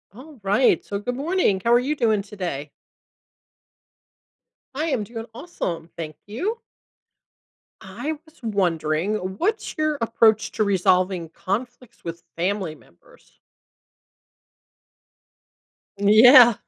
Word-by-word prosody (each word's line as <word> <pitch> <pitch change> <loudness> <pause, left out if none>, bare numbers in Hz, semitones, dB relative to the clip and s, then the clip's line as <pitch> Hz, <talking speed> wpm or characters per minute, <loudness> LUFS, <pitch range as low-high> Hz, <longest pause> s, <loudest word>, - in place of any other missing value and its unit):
Alright, 250 -4 0
so 200 - -3
good 245 +4 -3
morning, 280 - +1
how 235 - +4
are 240 - +6
you 280 +5 -1
doing 220 -5 +2
today? 175 -8 -5 2.1
I 310 +2 -1
am 255 -9 -1
doing 225 +1 -7
awesome, 180 - -5
thank 155 -2 -7
you. 375 - -3 1.2
I 310 +2 -5
was 315 0 -22
wondering, 180 -3 0
what's 265 - -2
your 310 -1 0
approach 225 -1 +3
to 215 - +1
resolving 185 -3 +1
conflicts 240 +7 -5
with 170 0 -7
family 185 -1 -1
members? 85 - -23 2.6
Yeah. 230 +4 +8
215 Hz, 100 wpm, -23 LUFS, 185-250 Hz, 2.6 s, Yeah